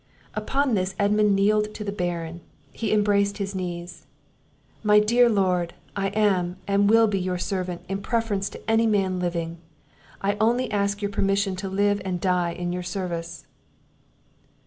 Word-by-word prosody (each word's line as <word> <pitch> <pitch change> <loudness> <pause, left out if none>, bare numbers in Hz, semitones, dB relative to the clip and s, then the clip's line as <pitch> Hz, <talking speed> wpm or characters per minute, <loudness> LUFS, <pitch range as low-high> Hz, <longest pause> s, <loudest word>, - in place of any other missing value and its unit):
Upon 265 +5 0
this 190 -1 0
Edmund 205 0 +3
kneeled 210 +2 +2
to 210 - -5
the 200 - -3
Baron; 175 -3 -3 0.3
he 225 - -3
embraced 205 -1 +2
his 200 -1 -3
knees. 175 -3 -6 0.7
"My 210 -1 +5
dear 235 +3 +4
Lord! 180 -5 +1 0.2
I 195 -1 0
am, 190 -3 +1
and 200 0 +3
will 225 +1 +6
be 205 -3 0
your 180 0 -2
servant, 180 -1 -3
in 195 +1 -3
preference 210 -4 -1
to - - -11
any 225 +1 +3
man 195 -4 +1
living; 170 -1 -3 0.6
I 200 +1 0
only 240 +2 +2
ask 200 0 0
your 205 - -1
permission 195 -1 +1
to 190 +1 -4
live 205 +1 +1
and 185 -2 -2
die 180 -2 +1
in 175 0 -3
your 180 - -3
service." 170 -2 -5
195 Hz, 160 wpm, -25 LUFS, 180-210 Hz, 0.7 s, will